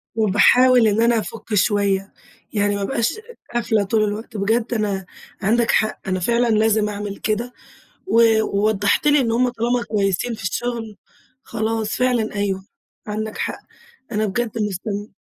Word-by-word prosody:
وباحاول 225 Hz, +3 st, +5 dB
إن 215 Hz, +2 st, +2 dB
أنا 235 Hz, -1 st, +3 dB
أفُك 220 Hz, +1 st, -7 dB
شوية، 200 Hz, -1 st, +1 dB, 0.4 s
يعني 205 Hz, -1 st, +1 dB
ما 200 Hz, -, -3 dB
ابقاش 230 Hz, +2 st, 0 dB, 0.4 s
قافلة 220 Hz, -3 st, +1 dB
طول 215 Hz, +2 st, +1 dB
الوقت، 210 Hz, +1 st, -4 dB
بجد 225 Hz, +4 st, 0 dB
أنا 200 Hz, -4 st, -1 dB, 0.4 s
عندك 230 Hz, +4 st, +2 dB
حق، 215 Hz, 0 st, +1 dB
أنا 185 Hz, -1 st, 0 dB
فعلًا 235 Hz, +5 st, +1 dB
لازم 215 Hz, -1 st, +2 dB
أعمل 205 Hz, -1 st, -5 dB
كده، 230 Hz, +3 st, -2 dB, 0.5 s
ووضَّحت 220 Hz, -, +2 dB
لي 295 Hz, 0 st, +5 dB
إن 230 Hz, -3 st, +1 dB
هُم 250 Hz, +2 st, +2 dB
طالما 240 Hz, +1 st, -1 dB
كويّسين 205 Hz, +2 st, -1 dB
في 215 Hz, -, -8 dB
الشغل 225 Hz, +1 st, -3 dB, 0.5 s
خلاص، 220 Hz, -1 st, -2 dB
فعلًا 245 Hz, -4 st, 0 dB
أيوه، 195 Hz, -1 st, -2 dB, 0.4 s
عندك 215 Hz, +1 st, -4 dB
حق، -, -, -3 dB, 0.5 s
أنا 215 Hz, 0 st, 0 dB
بجد 220 Hz, +2 st, -2 dB
مستم 205 Hz, 0 st, -4 dB
215 Hz, 140 wpm, -21 LUFS, 205-235 Hz, 0.5 s, وباحاول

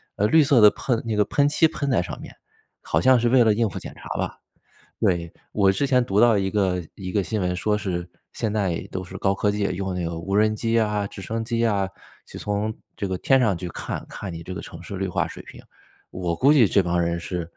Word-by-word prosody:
呃， 105 Hz, -, +2 dB
绿 160 Hz, +3 st, +5 dB
色 135 Hz, -5 st, +4 dB
的 105 Hz, -, +9 dB
喷 120 Hz, -4 st, -1 dB
那 110 Hz, -2 st, -1 dB
个 105 Hz, -, +3 dB
喷 140 Hz, +7 st, +2 dB
漆 160 Hz, +2 st, +4 dB
喷 150 Hz, -3 st, -3 dB
在 115 Hz, -, +3 dB
上 -, -, -6 dB
面， -, -, -11 dB, 0.5 s
好 80 Hz, -, 0 dB
像 130 Hz, +5 st, +5 dB
是 120 Hz, 0 st, +2 dB
为 125 Hz, -1 st, +6 dB
了 110 Hz, -2 st, +4 dB
应 115 Hz, +1 st, +1 dB
付 -, -, -7 dB
检 -, -, -9 dB
查 -, -, -11 dB
吧。 -, -, -3 dB, 0.6 s
对， 85 Hz, -2 st, 0 dB, 0.2 s
我 100 Hz, -2 st, +3 dB
之 140 Hz, +8 st, 0 dB
前 125 Hz, -2 st, +3 dB
读 100 Hz, -2 st, +1 dB
到 115 Hz, -3 st, +5 dB
一 95 Hz, 0 st, 0 dB
个 95 Hz, -3 st, 0 dB
一 95 Hz, -2 st, -6 dB
个 100 Hz, -1 st, +1 dB
新 110 Hz, +2 st, -2 dB
闻， 90 Hz, -1 st, 0 dB
说 105 Hz, +4 st, +1 dB
是 90 Hz, -4 st, -3 dB, 0.2 s
现 110 Hz, -2 st, -2 dB
在 95 Hz, -6 st, -1 dB
都 95 Hz, 0 st, -4 dB
是 90 Hz, -, -9 dB
高 95 Hz, 0 st, +1 dB
科 105 Hz, +1 st, +1 dB
技， 105 Hz, 0 st, -1 dB
用 95 Hz, 0 st, -2 dB
那 90 Hz, -1 st, -2 dB
个 85 Hz, 0 st, -4 dB
无 95 Hz, +4 st, -4 dB
人 110 Hz, +1 st, +3 dB
机 115 Hz, +1 st, +1 dB
啊、 105 Hz, -2 st, 0 dB
直 100 Hz, -, -10 dB
升 115 Hz, +3 st, -3 dB
机 115 Hz, 0 st, 0 dB
啊， 100 Hz, -3 st, +1 dB, 0.4 s
就 -, -, -10 dB
从 105 Hz, +1 st, -2 dB, 0.2 s
这 100 Hz, -, -2 dB
个 95 Hz, -1 st, -3 dB
天 135 Hz, +6 st, +3 dB
上 105 Hz, -8 st, +2 dB
去 90 Hz, -, -5 dB
看， -, -, -5 dB
看 100 Hz, -3 st, -7 dB
你 85 Hz, 0 st, -7 dB
这 90 Hz, +2 st, -7 dB
个 -, -, -6 dB
城 85 Hz, -, -10 dB
市 100 Hz, +3 st, -7 dB
绿 95 Hz, +1 st, -2 dB
化 90 Hz, -, 0 dB
水 -, -, -9 dB
平。 -, -, -13 dB, 0.5 s
我 90 Hz, -2 st, -2 dB
估 140 Hz, -, +4 dB
计 125 Hz, -8 st, +6 dB
这 100 Hz, -, +3 dB
帮 85 Hz, 0 st, 0 dB
人 85 Hz, 0 st, -1 dB
是， 90 Hz, 0 st, -4 dB
100 Hz, 275 characters per minute, -24 LUFS, 90-115 Hz, 0.6 s, 的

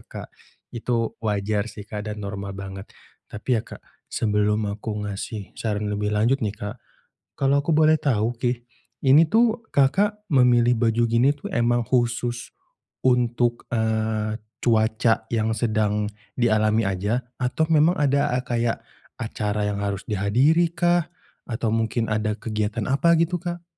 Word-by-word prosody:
Kak. -, -, -9 dB, 0.4 s
Itu 115 Hz, -1 st, -1 dB
wajar 105 Hz, 0 st, -1 dB
sih 105 Hz, -1 st, -9 dB
Kak, 105 Hz, 0 st, -6 dB
dan 105 Hz, -, -5 dB
normal 100 Hz, -1 st, -5 dB
banget 95 Hz, 0 st, -8 dB, 0.4 s
tapi 115 Hz, +3 st, -1 dB
ya -, -, -4 dB
Kak, -, -, -11 dB, 0.3 s
sebelum 105 Hz, -1 st, 0 dB
aku 105 Hz, 0 st, -4 dB
ngasih 105 Hz, 0 st, -5 dB
saran 105 Hz, -2 st, -2 dB
lebih 105 Hz, 0 st, -1 dB
lanjut 115 Hz, +6 st, +2 dB
nih 105 Hz, -4 st, -2 dB
Kak, 105 Hz, +3 st, -7 dB, 0.6 s
kalau 140 Hz, +1 st, +2 dB
aku 165 Hz, -, 0 dB
boleh 155 Hz, 0 st, +5 dB
tahu 120 Hz, -6 st, 0 dB
nih, 120 Hz, 0 st, -1 dB, 0.5 s
ini 150 Hz, +5 st, +8 dB
tuh 230 Hz, 0 st, +3 dB
Kakak, 205 Hz, +10 st, +2 dB
memilih 125 Hz, -3 st, +4 dB
baju 115 Hz, 0 st, +2 dB
gini 120 Hz, +5 st, +4 dB
tuh 145 Hz, -, -8 dB
emang 120 Hz, 0 st, +1 dB
khusus 120 Hz, -1 st, -1 dB, 0.5 s
untuk, 120 Hz, -1 st, +1 dB
eee, 110 Hz, -1 st, 0 dB, 0.2 s
cuaca 110 Hz, 0 st, +2 dB
yang 110 Hz, -1 st, 0 dB
sedang 105 Hz, -2 st, 0 dB, 0.2 s
dialami 110 Hz, -2 st, +2 dB
aja? 100 Hz, +5 st, -1 dB, 0.2 s
Atau 125 Hz, +5 st, 0 dB
memang 160 Hz, +3 st, +4 dB
ada 140 Hz, -3 st, +1 dB
a 125 Hz, -, -1 dB
kayak 120 Hz, -2 st, -1 dB, 0.3 s
acara 105 Hz, -2 st, -2 dB
yang 100 Hz, -, -3 dB
harus 100 Hz, 0 st, -2 dB
dihadiri 125 Hz, -, +2 dB
kah? 175 Hz, -1 st, +2 dB, 0.4 s
Atau 115 Hz, -2 st, -2 dB
mungkin 115 Hz, 0 st, 0 dB
ada 110 Hz, 0 st, 0 dB
kegiatan 110 Hz, 0 st, -3 dB
apa 170 Hz, +5 st, +4 dB
gitu, 170 Hz, +2 st, +1 dB
Kak? 175 Hz, 0 st, -5 dB
115 Hz, 145 wpm, -24 LUFS, 105-130 Hz, 0.6 s, ini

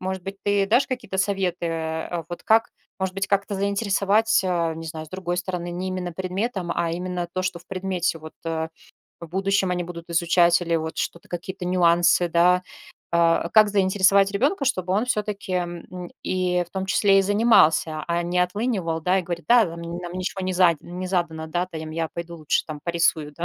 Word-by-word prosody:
Может 190 Hz, 0 st, -4 dB
быть, 195 Hz, +1 st, -6 dB
ты 200 Hz, -1 st, +2 dB
дашь 240 Hz, +6 st, +3 dB
какие-то 250 Hz, -7 st, -4 dB
советы, 190 Hz, -3 st, 0 dB
э, 165 Hz, +1 st, -3 dB
вот, 175 Hz, -, -7 dB
как, 225 Hz, +1 st, +4 dB, 0.3 s
может 190 Hz, 0 st, -2 dB
быть, 195 Hz, 0 st, -1 dB
как-то 200 Hz, 0 st, 0 dB
заинтересовать, 200 Hz, +2 st, +2 dB
э, 170 Hz, -3 st, 0 dB
не 165 Hz, -, -7 dB
знаю, 155 Hz, 0 st, -6 dB
с -, -, -16 dB
другой 180 Hz, 0 st, -3 dB
стороны, 180 Hz, -1 st, -3 dB
не 185 Hz, +2 st, -3 dB
именно 180 Hz, -2 st, -4 dB
предметом, 190 Hz, +1 st, -3 dB
а 170 Hz, -1 st, -1 dB
именно 180 Hz, 0 st, -3 dB
то, 185 Hz, -, -2 dB
что 185 Hz, -1 st, -2 dB
в 175 Hz, -, -21 dB
предмете. 185 Hz, -3 st, -2 dB
Вот, 155 Hz, 0 st, -11 dB
э, 160 Hz, -1 st, -2 dB, 0.5 s
в 170 Hz, -, -7 dB
будущем 195 Hz, +1 st, +1 dB
они 180 Hz, -1 st, -1 dB
будут 170 Hz, -1 st, -9 dB
изучать 170 Hz, +1 st, +4 dB
или 170 Hz, -1 st, -1 dB
вот 160 Hz, 0 st, -4 dB
что-то, 170 Hz, -, -4 dB
какие-то 185 Hz, +2 st, -6 dB
нюансы, 175 Hz, -1 st, +3 dB
да? 180 Hz, +2 st, +4 dB, 0.5 s
Э, 170 Hz, 0 st, +3 dB
как 215 Hz, -1 st, +7 dB
заинтересовать 195 Hz, 0 st, +3 dB
ребёнка, 275 Hz, -, +1 dB
чтобы 185 Hz, -8 st, 0 dB
он 210 Hz, +5 st, +1 dB
всё-таки, 210 Hz, -4 st, -2 dB
м, 175 Hz, 0 st, -4 dB
и 180 Hz, -1 st, 0 dB
в 175 Hz, -, -24 dB
том 190 Hz, 0 st, -3 dB
числе 195 Hz, 0 st, +4 dB
и -, -, +1 dB
занимался, 190 Hz, -7 st, +3 dB
а 170 Hz, 0 st, +1 dB
не 180 Hz, +1 st, 0 dB
отлынивал, 180 Hz, -3 st, -1 dB
да, 180 Hz, +4 st, +2 dB
и -, -, -1 dB
говорит: 175 Hz, 0 st, -5 dB
"Да, 240 Hz, -1 st, +7 dB
намь 170 Hz, -2 st, -7 dB, 0.2 s
нам 175 Hz, -, -6 dB
ничего 185 Hz, +1 st, -3 dB
не 185 Hz, -, -1 dB
задь 175 Hz, -3 st, +4 dB
не 180 Hz, +1 st, -6 dB
задано". 170 Hz, -4 st, -1 dB
Да, 175 Hz, +3 st, -1 dB
та, 165 Hz, -3 st, -7 dB
ем, 155 Hz, 0 st, -6 dB
я 165 Hz, 0 st, -2 dB
пойду 170 Hz, 0 st, -6 dB
лучше 155 Hz, -2 st, 0 dB
там 150 Hz, -2 st, -7 dB
порисую, 165 Hz, -3 st, +1 dB
да. 170 Hz, -, -3 dB
180 Hz, 200 wpm, -24 LUFS, 170-195 Hz, 0.5 s, как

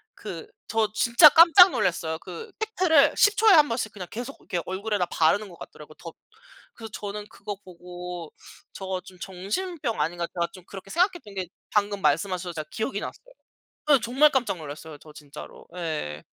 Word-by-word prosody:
그 440 Hz, -, -8 dB, 0.2 s
저 225 Hz, -1 st, +1 dB
진짜 235 Hz, +7 st, +7 dB
깜짝 335 Hz, +4 st, +8 dB
놀랐어요. 170 Hz, -8 st, -1 dB
그 455 Hz, -, -9 dB
팩트를 350 Hz, -9 st, +3 dB
10 415 Hz, 0 st, +4 dB
초에 440 Hz, +1 st, +5 dB
1 305 Hz, -5 st, +7 dB
번씩 230 Hz, -3 st, -3 dB
그냥 185 Hz, -4 st, -8 dB
계속 245 Hz, +4 st, -7 dB
이렇게 175 Hz, -, -4 dB
얼굴에다 200 Hz, 0 st, -2 dB
바르는 195 Hz, +6 st, +1 dB
것 170 Hz, -, -15 dB
같더라고 150 Hz, 0 st, -12 dB
덧 170 Hz, -2 st, -11 dB, 0.6 s
그래서 225 Hz, -1 st, -10 dB
저는 205 Hz, 0 st, -6 dB
그거 205 Hz, 0 st, -8 dB
보고 180 Hz, -1 st, -9 dB, 0.4 s
'저거 190 Hz, -1 st, -5 dB
좀 185 Hz, 0 st, -16 dB
정신병 220 Hz, -, -4 dB
아닌가.' 170 Hz, +3 st, -1 dB
제가 170 Hz, -1 st, -1 dB
좀 185 Hz, -, -13 dB
그렇게 195 Hz, 0 st, -11 dB
생각했던 345 Hz, -, -1 dB
게 190 Hz, -2 st, -4 dB, 0.2 s
방금 205 Hz, -1 st, 0 dB
말씀하셔서 175 Hz, +3 st, 0 dB
제가 155 Hz, -2 st, -7 dB
기억이 220 Hz, +5 st, -3 dB
났어요. -, -, -8 dB, 0.7 s
예 280 Hz, -3 st, +6 dB
정말 260 Hz, +6 st, +4 dB
깜짝 250 Hz, -8 st, 0 dB
놀랐어요 155 Hz, 0 st, -9 dB
저 155 Hz, +1 st, -16 dB
진짜로. 145 Hz, -1 st, -12 dB
예. 155 Hz, -, -4 dB
200 Hz, 350 characters per minute, -25 LUFS, 175-260 Hz, 0.7 s, 깜짝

